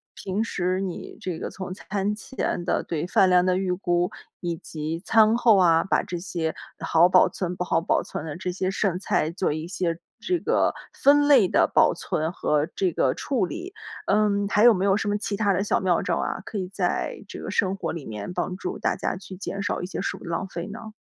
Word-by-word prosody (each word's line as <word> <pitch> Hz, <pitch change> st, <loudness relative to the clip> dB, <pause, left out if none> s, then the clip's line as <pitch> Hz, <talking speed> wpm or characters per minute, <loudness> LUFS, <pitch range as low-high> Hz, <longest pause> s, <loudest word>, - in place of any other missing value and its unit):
平 195 Hz, +3 st, -2 dB
时 185 Hz, -4 st, -1 dB
你 185 Hz, -3 st, -6 dB
这 180 Hz, -3 st, -4 dB
个， -, -, -4 dB
从 185 Hz, -1 st, -6 dB
餐 200 Hz, +1 st, -2 dB
前 215 Hz, -5 st, -3 dB
的 -, -, 0 dB
对 165 Hz, 0 st, -3 dB
饭 185 Hz, +1 st, +4 dB
量 180 Hz, 0 st, +5 dB
的 185 Hz, 0 st, +2 dB
预 190 Hz, -1 st, -1 dB
估， 180 Hz, -1 st, 0 dB, 0.3 s
以 175 Hz, -1 st, -2 dB
及 160 Hz, +1 st, -5 dB
餐 220 Hz, 0 st, +5 dB
后 235 Hz, -4 st, +5 dB
啊， 165 Hz, -3 st, +5 dB
把 -, -, +1 dB
这 175 Hz, -, -5 dB
些 170 Hz, -3 st, -3 dB, 0.3 s
好 170 Hz, +2 st, +4 dB
保 185 Hz, 0 st, +6 dB
存、 180 Hz, -1 st, -3 dB
不 180 Hz, -, -2 dB
好 175 Hz, -, +1 dB
保 -, -, +1 dB
存 -, -, -6 dB
的 150 Hz, -2 st, -5 dB
这 180 Hz, 0 st, -3 dB
些 185 Hz, +1 st, -1 dB
剩 190 Hz, -2 st, 0 dB
菜 160 Hz, -4 st, 0 dB
做 180 Hz, 0 st, -1 dB
一 155 Hz, +2 st, -4 dB
些 175 Hz, -2 st, -2 dB, 0.2 s
这 355 Hz, +10 st, 0 dB
个 460 Hz, +8 st, +2 dB, 0.2 s
分 290 Hz, +1 st, +4 dB
类 265 Hz, -9 st, +6 dB
的 -, -, +3 dB
保 -, -, +5 dB
存 160 Hz, +1 st, -2 dB
和 150 Hz, -4 st, 0 dB
这 185 Hz, -2 st, +1 dB
个 130 Hz, -4 st, +1 dB
处 260 Hz, -8 st, 0 dB
理。 360 Hz, -, -7 dB, 0.3 s
嗯， 205 Hz, 0 st, +2 dB
还 210 Hz, +1 st, +3 dB
有 240 Hz, -1 st, +8 dB
没 190 Hz, +1 st, 0 dB
有 195 Hz, -1 st, +4 dB
什 205 Hz, -, -2 dB
么 205 Hz, 0 st, +1 dB
其 205 Hz, -1 st, -3 dB
它 205 Hz, -1 st, +2 dB
的 195 Hz, +1 st, +1 dB
小 205 Hz, -, +1 dB
妙 180 Hz, -3 st, +2 dB
招 -, -, 0 dB
啊？ -, -, -2 dB
可 215 Hz, -, -5 dB
以 185 Hz, -, -3 dB
在 -, -, -2 dB
这 -, -, -8 dB
个 -, -, -5 dB
生 190 Hz, 0 st, +1 dB
活 195 Hz, -, -3 dB
里 160 Hz, -3 st, -6 dB
面 105 Hz, +9 st, -6 dB
帮 180 Hz, -, -2 dB
助 185 Hz, -, -4 dB
大 -, -, 0 dB
家 -, -, -2 dB
去 190 Hz, 0 st, -10 dB
减 195 Hz, +1 st, -5 dB
少 -, -, -1 dB
一 -, -, -3 dB
些 -, -, -5 dB
食 -, -, -2 dB
物 -, -, -14 dB
浪 170 Hz, +2 st, -2 dB
费 175 Hz, -2 st, -6 dB
呢？ 220 Hz, +1 st, -9 dB
185 Hz, 250 characters per minute, -25 LUFS, 175-205 Hz, 0.3 s, 有